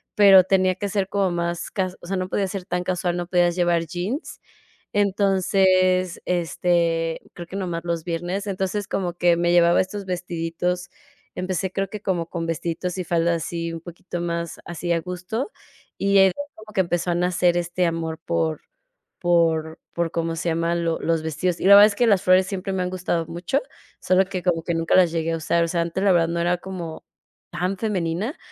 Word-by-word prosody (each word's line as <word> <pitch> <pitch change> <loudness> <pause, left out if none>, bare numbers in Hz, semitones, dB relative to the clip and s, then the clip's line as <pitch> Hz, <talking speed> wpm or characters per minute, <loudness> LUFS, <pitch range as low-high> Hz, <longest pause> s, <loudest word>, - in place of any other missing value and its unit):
pero 195 -3 +8
tenía 185 0 +2
que 205 +1 -3
ser 195 -1 0
como 195 -2 +1
más 170 0 -2
cas 185 -2 -2
o 175 - -11
sea, 195 0 -1
no 185 0 -3
podía 195 - 0
ser 185 -1 -5
tan 180 0 -2
casual, 180 -1 -1
no 175 -1 -3
podías 175 -1 +2
llevar 175 -2 +1
jeans. 185 - -5 0.5
Entonces, 185 -2 +2
este, 170 -1 0
creo 175 -1 -8
que 190 - -8
nomás 175 -3 -3
los 170 -2 -2
viernes. 175 +4 -3
Entonces, 195 +1 -2
como 180 -3 -2
que 175 -1 +3
me 175 0 +1
llevaba 170 0 +5
estos 195 +1 -7
vestiditos, 175 0 -3 0.5
empecé 185 0 -2
creo 195 0 -1
que 210 - -6
como 175 -4 -1
con 165 -1 -3
vestiditos 170 +2 -3
y 180 - -2
faldas 170 -1 +1
así 170 -1 -3
un 165 - -6
poquito 175 0 -7
más 170 -1 -3
así 175 0 -5
a 165 - +1
gusto, 180 - -4 0.5
y 200 0 +1
de 195 - +7
ahí 185 - +2 0.2
como 215 0 -13
que 190 - +2
empezó 175 0 -1
a - - 0
nacer 180 0 +2
este 175 +1 -1
amor 165 -1 -2
por 80 -2 -1 0.6
por 165 -2 +2 0.2
por, 170 -1 -1
¿cómo 165 -1 -2
se 175 +1 -2
llama?, 165 +1 0
lo 165 -1 -1
los 165 -1 0
vestidos. 165 +3 -2
Y - - -4
la 200 - +9
verdad 205 - +10
es 210 - -1
que 240 - +3
las 195 -3 +4
flores 185 0 +4
siempre 195 0 -4
me 185 -1 -1
han 180 - -1
gustado 175 -3 -2
mucho, 175 +9 -1 0.4
solo 185 +1 +3
que 185 -2 -4
como 165 -3 +1
que 170 - -1
nunca 165 +1 +2
las 175 -3 +5
llegué 165 0 -1
a - - 0
usar. 170 +1 +1
O - - -2
sea, 170 0 0
antes 170 +3 -3
la 195 - +5
verdad 165 -1 +3
no 170 0 -2
era 175 +1 +2
como 175 -4 -7 0.5
tan 185 +2 -2
femenina. 195 - -2
175 Hz, 205 wpm, -23 LUFS, 170-185 Hz, 0.6 s, verdad